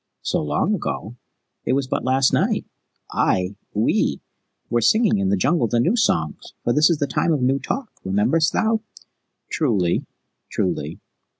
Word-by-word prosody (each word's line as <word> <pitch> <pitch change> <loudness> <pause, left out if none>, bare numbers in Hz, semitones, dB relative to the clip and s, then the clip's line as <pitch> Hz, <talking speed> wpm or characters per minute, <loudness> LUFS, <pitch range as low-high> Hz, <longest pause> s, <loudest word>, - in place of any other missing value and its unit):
"So - - 0
long 75 - 0
ago? 120 - -4 0.5
It 125 - 0
was 135 0 +1
but - - -2
last 130 +1 +2
night. - - +1 0.5
I 90 +1 +1 0.2
we 105 +2 +1 0.5
were 120 0 +1
singing 215 - +3
in 95 -1 +1
the 100 - +2
Jungle 140 - +2
the 120 - +1
new 175 - +2
songs, 80 - 0
for 120 - +1
this 150 +4 +5
is 170 - +2
the 145 - 0
Time 165 - 0
of 145 -5 +1
New 135 +2 +2
Talk. 260 - -4
Rememberest 115 - +2
thou?" 220 0 +1 0.7
"Truly, 100 - +1 0.4
truly." - - -2
130 Hz, 160 wpm, -22 LUFS, 105-165 Hz, 0.7 s, this